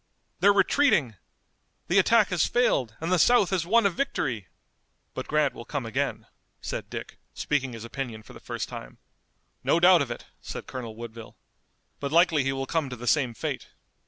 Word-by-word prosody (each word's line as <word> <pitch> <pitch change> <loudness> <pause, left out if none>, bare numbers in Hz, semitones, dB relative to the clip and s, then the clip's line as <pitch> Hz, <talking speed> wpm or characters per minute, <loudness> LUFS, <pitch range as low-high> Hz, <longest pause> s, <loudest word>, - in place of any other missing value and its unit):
they're 205 - +6
retreating! 195 - +3 0.7
The 185 +3 +4
attack 215 +2 +4
has 180 -4 +2
failed 130 - +1
and 165 +3 -3
the 185 - +3
South 240 -1 +4
has 175 -3 0
won 230 +2 +4
a 200 - +4
victory!" 135 - -2 0.7
"But - - -5
Grant 150 -2 +2
will - - -9
come 140 0 -4
again," 115 - -2 0.3
said - - -5
Dick, - - -7 0.2
speaking 135 -4 -1
his 115 0 -8
opinion 115 -3 -6
for - - -14
the - - -11
first - - -5
time. - - -9 0.7
"No 165 - +3
doubt 180 0 +7
of 140 - -2
it," 120 - -6 0.2
said - - -7
Colonel 120 -4 -7
Woodville, 115 -1 -10 0.6
"but 140 -1 -3
likely 165 -3 +4
he 135 - 0
will 135 0 -3
come 155 -1 -1
to 125 - -5
the 120 0 -9
same 125 -2 +2
fate." - - -4
145 Hz, 185 wpm, -26 LUFS, 120-180 Hz, 0.7 s, doubt